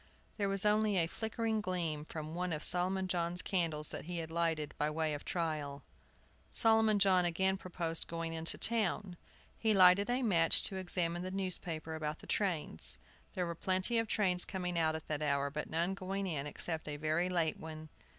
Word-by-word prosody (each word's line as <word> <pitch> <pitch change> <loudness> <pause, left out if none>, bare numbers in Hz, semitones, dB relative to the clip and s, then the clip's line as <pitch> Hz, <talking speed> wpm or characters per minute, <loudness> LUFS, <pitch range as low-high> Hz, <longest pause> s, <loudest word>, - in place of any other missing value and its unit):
There 200 -2 0
was 195 +1 0
only 210 -1 +3
a 170 - +4
flickering 220 +4 -2
gleam 170 -6 -2
from 155 0 -6
one 180 0 -2
of 155 - -3
Solomon 185 +2 +1
John's 175 0 0
candles 165 -5 0
that - - -6
he 175 +1 -4
had 160 -1 -4
lighted 165 -3 0
by 150 - +2
way 155 0 -1
of 145 - -5
trial. 150 -5 -3 0.7
Solomon 220 -1 +4
John 190 -2 +5
again 190 +2 +2
proposed 170 -3 -2
going 165 0 -3
into 165 0 -3
town. 205 -4 +1 0.4
He 220 -2 +2
lighted 190 +3 +6
a 250 +2 +1
match 170 -7 +4
to 190 - 0
examine 175 -2 -1
the 185 - -4
newspaper 180 -4 -2
about 155 -1 -3
the - - -14
trains. 175 - -1 0.4
There 180 - -1
were 170 - -3
plenty 185 +7 +1
of 225 - -1
trains 185 -5 +1
coming 180 -2 -3
out 160 -1 +2
at 160 - -7
that 150 -1 -2
hour, 140 -1 +1
but 150 +1 -4
none 170 +4 0
going 195 +1 -3
in 150 -6 -2
except 160 +1 -4
a 145 -1 -4
very 155 +4 0
late 170 -3 +1
one. 155 -1 -8
175 Hz, 190 wpm, -34 LUFS, 160-190 Hz, 0.7 s, lighted